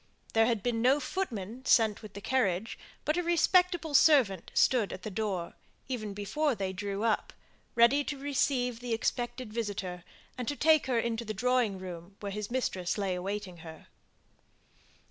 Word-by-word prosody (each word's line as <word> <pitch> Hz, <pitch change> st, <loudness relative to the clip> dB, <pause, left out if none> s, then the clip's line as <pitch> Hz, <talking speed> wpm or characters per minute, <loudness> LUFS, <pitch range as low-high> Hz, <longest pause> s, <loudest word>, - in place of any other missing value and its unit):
There 225 Hz, 0 st, +4 dB
had 230 Hz, -5 st, 0 dB
been 235 Hz, -2 st, 0 dB
no 260 Hz, +4 st, +4 dB
footman 255 Hz, -, -4 dB
sent 220 Hz, -5 st, +4 dB
with 215 Hz, -3 st, -11 dB
the 200 Hz, -, -7 dB
carriage, 215 Hz, -5 st, 0 dB, 0.3 s
but 305 Hz, +3 st, +1 dB
a -, -, +2 dB
respectable 345 Hz, -1 st, +2 dB
servant 260 Hz, -, +4 dB
stood 235 Hz, -6 st, +3 dB
at 185 Hz, -, -7 dB
the 215 Hz, -, -5 dB
door, 190 Hz, -4 st, -2 dB, 0.3 s
even 215 Hz, -6 st, -4 dB
before 255 Hz, +8 st, 0 dB
they 190 Hz, -2 st, -3 dB
drew 200 Hz, +2 st, -3 dB
up, 225 Hz, -2 st, +1 dB, 0.4 s
ready 235 Hz, +5 st, +5 dB
to 290 Hz, -, -3 dB
receive 265 Hz, -3 st, 0 dB
the 245 Hz, -1 st, -3 dB
expected 240 Hz, 0 st, -2 dB
visitor, 200 Hz, -6 st, -4 dB, 0.4 s
and 245 Hz, -, -3 dB
take 315 Hz, -2 st, +4 dB
her 250 Hz, -2 st, +1 dB
into 230 Hz, 0 st, -1 dB
the 215 Hz, -1 st, -5 dB
drawing 245 Hz, -2 st, +1 dB
room 180 Hz, 0 st, -8 dB
where 200 Hz, -1 st, -5 dB
his 210 Hz, 0 st, -4 dB
mistress 205 Hz, -8 st, -1 dB
lay 195 Hz, -2 st, 0 dB
awaiting 190 Hz, 0 st, -4 dB
her. 160 Hz, -1 st, -12 dB
225 Hz, 165 wpm, -30 LUFS, 195-255 Hz, 0.4 s, ready